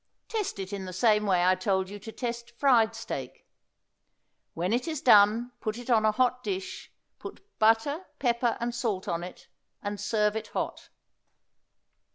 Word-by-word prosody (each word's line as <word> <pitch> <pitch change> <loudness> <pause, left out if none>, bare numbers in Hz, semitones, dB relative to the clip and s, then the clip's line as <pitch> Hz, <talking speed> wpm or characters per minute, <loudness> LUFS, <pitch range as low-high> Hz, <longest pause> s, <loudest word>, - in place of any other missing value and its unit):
Test 430 - -2
it 195 0 -6
in 195 -1 -4
the 185 - -7
same 210 +1 +3
way 180 -2 +3
I 185 - +5
told 190 0 0
you 205 +2 -8
to 225 - -9
test 235 0 -5
fried 240 -5 +4
steak. - - -6 1.1
When 180 +5 -1
it 245 +7 0
is 315 -3 -2
done 225 -1 +5
put 215 0 -3
it 245 +1 -5
on 220 -2 +4
a 215 - +5
hot 250 +2 +1
dish; 190 -2 -5 0.3
put - - -10
butter, 225 +10 +2
pepper 240 -2 +1
and 235 0 -2
salt 225 -6 -2
on 170 0 -2
it, 180 - -10 0.4
and 205 0 -4
serve 210 0 +1
it 220 -1 -4
hot. - - -4
220 Hz, 170 wpm, -28 LUFS, 200-240 Hz, 1.1 s, I